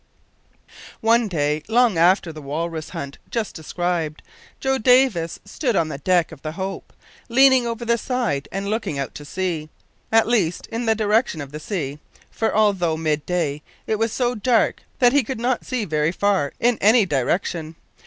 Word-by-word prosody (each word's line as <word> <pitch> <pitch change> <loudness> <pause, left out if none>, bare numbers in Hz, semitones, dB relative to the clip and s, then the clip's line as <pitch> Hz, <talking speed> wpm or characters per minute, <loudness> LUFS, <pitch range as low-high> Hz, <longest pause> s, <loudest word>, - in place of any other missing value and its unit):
One 230 +1 +3
day, 150 -4 0
long 235 -2 +3
after 170 0 +3
the 155 - -9
walrus 155 +2 -4
hunt 140 0 -7
just 230 -3 -2
described, 165 -1 -3 0.4
Joe 265 0 0
Davis 240 -9 +3
stood 240 +3 -2
on 160 -3 +1
the 140 - -6
deck 175 +2 +2
of 155 -4 -12
the 155 0 -5
Hope, 190 +2 -5 0.4
leaning 260 0 +5
over 235 0 -4
the 235 0 +2
side 190 - -1
and 195 +1 -3
looking 215 -8 -2
out 140 -1 -3
to 145 - -9
sea 165 -2 -3 0.4
at 225 0 +5
least 195 -8 +1
in 230 +1 -3
the 220 - +4
direction 215 -4 +1
of 140 -2 -7
the 150 - -6
sea, 150 -5 -4 0.3
for, 225 - 0
although 190 -7 +2
mid 155 -2 -1
day, 155 -5 -1 0.2
it 215 - -1
was 225 0 +1
so 245 0 0
dark 235 +1 +1 0.2
that 245 -1 +4
he 285 -1 +4
could 250 +1 -5
not 245 +1 -1
see 250 -4 -1
very 155 -2 0
far 190 -6 +1
in 240 -1 +2
any 220 +2 +5
direction. 160 +2 -1
190 Hz, 175 wpm, -22 LUFS, 155-230 Hz, 0.4 s, leaning